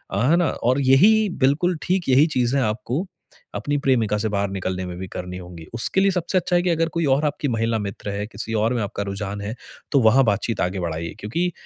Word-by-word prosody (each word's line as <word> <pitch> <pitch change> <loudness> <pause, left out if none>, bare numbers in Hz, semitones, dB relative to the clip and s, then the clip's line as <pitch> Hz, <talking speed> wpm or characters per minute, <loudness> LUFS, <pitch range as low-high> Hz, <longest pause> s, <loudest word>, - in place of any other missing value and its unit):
है 125 +11 +3
ना? 175 -4 +2
और 130 +3 0
यही 200 +12 +5
बिल्कुल 160 +6 +2
ठीक 180 -3 0
यही 135 +3 +6
चीज़ें 125 +3 +2
आपको, 115 - -2 0.5
अपनी 145 0 -1
प्रेमिका 120 -7 +1
से 110 +1 -1
बाहर 100 -1 -1
निकलने 95 -1 -3
में 90 -1 -6
भी 95 +1 -6
करनी 90 0 -6
होगी। 90 -2 -10
उसके 120 +11 0
लिए 195 0 +4
सबसे 180 +1 -1
अच्छा 180 0 +1
है 175 - +4
कि 180 - +1
अगर 165 -1 +1
कोई 170 0 -1
और 150 +3 0
आपकी 150 0 -1
महिला 115 -2 0
मित्र 100 0 -5
है, 100 +1 -3
किसी 115 0 -6
और 110 +2 +1
में 120 - -1
आपका 100 0 -4
रुझान 100 +1 -5
है, 105 +3 -4 0.4
तो 140 - +4
वहाँ 120 +4 +5
बातचीत 110 +2 0
आगे 90 +2 -1
बढ़ाइए। 85 -1 -4
क्योंकि 170 +13 -1
115 Hz, 220 wpm, -22 LUFS, 100-150 Hz, 0.5 s, यही